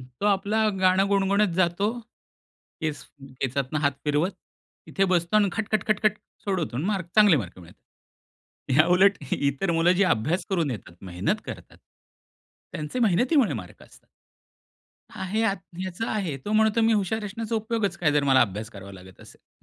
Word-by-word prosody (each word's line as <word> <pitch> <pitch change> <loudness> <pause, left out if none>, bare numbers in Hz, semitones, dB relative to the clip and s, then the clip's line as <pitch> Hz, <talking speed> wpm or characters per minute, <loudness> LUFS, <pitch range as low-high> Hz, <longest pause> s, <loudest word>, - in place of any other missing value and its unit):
तो 125 +9 -6
आपला 210 +2 +2
गाणं 190 +1 +3
गुणगुणत 200 0 +2
जातो, 185 +3 +1 0.9
केस 155 -2 -3 0.4
केसातनं 135 +3 -1
हात 140 -1 +2
फिरवत. 150 +6 +1 0.5
इथे 195 - 0
बसतो 175 +3 +1
आणि 205 -1 +4
खट-खट-खट-खट 215 0 0 0.3
सोडवतो 185 - -2
आणि 145 - -2
मार 200 -2 0
चांगले 210 -6 +6
मार्क 95 -9 -5
मिळतात. 85 -1 -16 1.0
याउलट 180 +5 +5 0.2
इतर 140 +6 0
मुलं 165 +2 +3
जी 185 +2 +2
अभ्यास 160 +11 -2
करून 170 -7 0
येतात, 95 -7 -7
मेहनत 90 -1 -2
करतात. - - -9 0.9
त्यांचे 150 +10 -5
मेहनतीमुळे 240 - +3
मार्क 90 -5 -9
असतात. - - -19 1.0
आहे 195 +4 -3
यात, 200 -3 +1 0.3
याचा 185 +5 -4
आहे, 185 -10 -2
तो 210 - -3
म्हणतो, 220 +1 +3
मी 225 0 +4
हुशार 210 +1 0
असण्याचा 220 +3 -4
उपयोगच 220 -4 -1
काय, 155 -6 +1
जर 145 -1 +2
मला 135 -1 +5
अभ्यास 105 0 -1
करावा 100 -2 -11
लागत 95 -1 -14
असेल - - -19
185 Hz, 150 wpm, -25 LUFS, 140-210 Hz, 1.0 s, चांगले